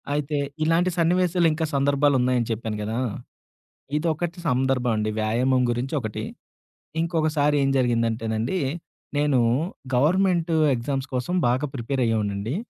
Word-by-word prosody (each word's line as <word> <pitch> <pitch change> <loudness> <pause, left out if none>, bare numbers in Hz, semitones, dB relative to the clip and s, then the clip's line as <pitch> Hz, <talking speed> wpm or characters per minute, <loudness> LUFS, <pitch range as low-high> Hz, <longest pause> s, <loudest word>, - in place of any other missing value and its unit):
అయితే, 150 0 -1 0.3
ఇలాంటి 165 +3 +3
సన్నివేశాలు 175 0 +3
ఇంక 160 +1 -2
సందర్భాలు 140 +1 +3
ఉన్నాయని 125 -2 +1
చెప్పాను 110 -1 -3
గదా! 110 +3 -2 1.0
ఇదొకటి 165 +2 -2
సందర్భం 125 -1 +1
అండి. 105 0 0
వ్యాయామం 125 +4 +2
గురించి 120 +4 -3
ఒకటి. 110 -3 -4 0.8
ఇంకొకసారి 155 -3 +1
ఏం 135 - +2
జరిగిందంటేనండి, 115 +2 0 0.6
నేను 145 -3 +2 0.6
గవర్నమెంట్ 170 +4 +2 0.2
ఎగ్జామ్స్ 135 +3 -3
కోసం 125 +9 -1
బాగా 130 +5 +1
ప్రిపేర్ 130 +2 -2
అయ్యేవాన్నండి. 105 +1 -1
135 Hz, 115 wpm, -24 LUFS, 115-155 Hz, 1.0 s, ఇలాంటి